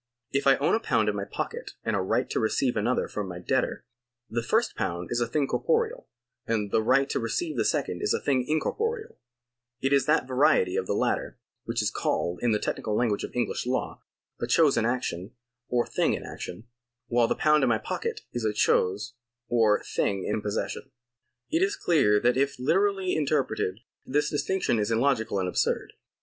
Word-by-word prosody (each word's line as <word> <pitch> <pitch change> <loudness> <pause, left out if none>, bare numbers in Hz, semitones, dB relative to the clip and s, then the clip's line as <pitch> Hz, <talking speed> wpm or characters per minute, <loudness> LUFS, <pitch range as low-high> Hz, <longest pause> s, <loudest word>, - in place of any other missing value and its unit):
If 140 0 0
I 135 - +7
own 140 - +1
a 220 - +3
pound 110 - +1
in 105 - -1
my 100 -1 -3
pocket - - -5
and 110 -1 0
a 100 - +1
right 95 - 0
to - - 0
receive 120 +3 +1
another 115 +4 +1
from 105 -2 -4
my 90 -1 -6
debtor, 90 - -1 0.5
the 120 +1 0
first 220 - +1
pound 85 0 -3
is 120 0 0
a 120 - +1
thing 145 +4 +1
corporeal, 470 - 0 0.4
and 105 -3 -1
the - - +3
right 135 +5 +3
to - - 0
receive 315 - -2
the - - +1
second - - -1
is 415 - 0
a - - +2
thing 130 -3 +1
incorporeal; 435 - -2 0.6
it 135 +1 +1
is 140 +1 +3
that 150 -4 +3
variety 125 -8 +3
of - - -1
the - - 0
latter, - - -1 0.3
which - - -1
is - - 0
called, 85 +1 -1
in 120 - +2
the 105 - +3
technical 105 0 -2
language 110 -3 +1
of - - -6
EngHsh 125 0 -1
law, 130 - -2 0.4
a - - -1
chose 155 -4 +4
in 115 - +2
action 110 -6 -3 0.3
or 120 -1 +1
thing - - +1
in - - -7
action; 90 +5 -7 0.4
while 120 -1 +2
the - - 0
pound 150 0 +3
in 130 - +3
my 115 - +3
pocket - - -4
is 120 - -3
a 110 -1 +1
chose 100 +2 +1 0.4
or 115 -3 +3
thing 100 -2 -1
in 105 +1 -1
possession.^ 105 -1 -3 0.6
It 325 - +2
is 400 +1 +2
clear 105 - +3
that 125 +1 +3
if 140 +1 +1
literally 190 +7 +1
interpreted, 135 -9 0 0.2
this 145 +3 0
distinction 150 -5 0
is 105 - 0
illogical 115 -2 +1
and 95 -1 0
absurd. 90 - -1
120 Hz, 195 wpm, -27 LUFS, 105-150 Hz, 0.6 s, I